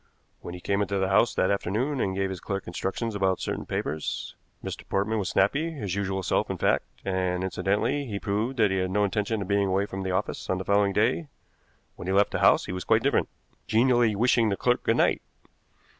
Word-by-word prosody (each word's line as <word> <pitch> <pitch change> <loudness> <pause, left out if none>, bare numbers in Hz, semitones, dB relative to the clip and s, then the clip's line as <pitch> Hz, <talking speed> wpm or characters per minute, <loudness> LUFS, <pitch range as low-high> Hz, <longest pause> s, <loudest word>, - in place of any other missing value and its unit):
When 85 - -8
he - - -8
came 100 +3 0
into 100 0 -1
the 95 0 0
house 105 +4 +3
that 95 - +2
afternoon 115 +8 -1
and 95 -1 -1
gave 95 0 -1
his 95 - -5
clerk 100 +3 -4
instructions 95 +6 -3
about 95 -2 +1
certain - - -4
papers 75 0 -3 0.3
Mr. - - -5
Portman 105 +3 0
was 95 - -2
snappy, 140 +12 +2
his 105 - -4
usual 95 -1 -2
self, - - 0
in - - -3
fact, - - +1 0.2
and, 95 -1 -1
incidentally, 105 +9 0
he 100 -3 -4
proved 110 +7 -2
that 105 -4 +3
he 95 - 0
had 95 0 0
no 105 +2 +1
intention 105 +1 -1
of - - -9
being 100 0 +2
away 95 +1 +1
from 95 -1 -6
the 95 - -3
office 95 +3 -2
on 95 - +1
the 95 - -5
following 100 0 +3
day; 120 - +1 0.7
when 90 - -7
he 95 - 0
left 100 +1 +4
the - - -2
house - - +5
he - - -5
was 90 -1 -4
quite - - +2
different, - - +1 0.4
genially 120 -1 +3
wishing 115 +1 +3
the 100 - -1
clerk 125 0 +1
good - - +1
night. - - +2
100 Hz, 220 wpm, -26 LUFS, 95-110 Hz, 0.7 s, house